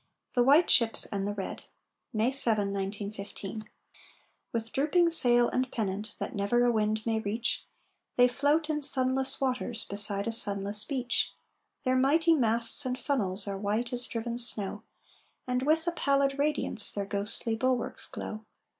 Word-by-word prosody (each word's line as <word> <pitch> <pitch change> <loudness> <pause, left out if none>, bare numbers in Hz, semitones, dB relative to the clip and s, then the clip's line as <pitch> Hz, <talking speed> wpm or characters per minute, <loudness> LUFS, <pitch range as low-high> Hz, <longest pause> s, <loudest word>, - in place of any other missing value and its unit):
THE 245 - +2
WHITE 285 +7 +5
SHIPS 230 -2 +5
AND 200 -1 -3
THE 205 - -2
RED 195 - -5 0.5
[May 225 +2 +1
7, 215 -7 +4
1915] 200 +1 -6 0.8
With 225 -1 -3
drooping 335 +5 +2
sail 240 -7 +4
and 255 0 -2
pennant 210 -1 -4
That - - -5
never 225 +4 +1
a 240 - +3
wind 215 -1 -1
may 225 -1 0
reach, 220 +2 -3 0.5
They 245 0 +5
float 290 +5 0
in 305 -1 -2
sunless 265 -1 +2
waters 250 -3 -2
Beside 200 0 +2
a - - -1
sunless 205 -1 0
beach. 255 -3 -1 0.5
Their 255 -1 +1
mighty 320 +6 +3
masts 235 -1 +2
and 255 -1 -3
funnels 205 -9 -2
Are 195 -1 -4
white 215 +5 -2
as 245 0 0
driven 235 +1 -4
snow, 210 -3 0 0.6
And 250 0 -1
with 320 +1 +2
a 345 - 0
pallid 275 -3 0
radiance 290 -7 +1
Their 200 -1 -4
ghostly 205 +3 -2
bulwarks 250 +1 -2
glow. 215 0 -7
235 Hz, 155 wpm, -28 LUFS, 210-265 Hz, 0.8 s, WHITE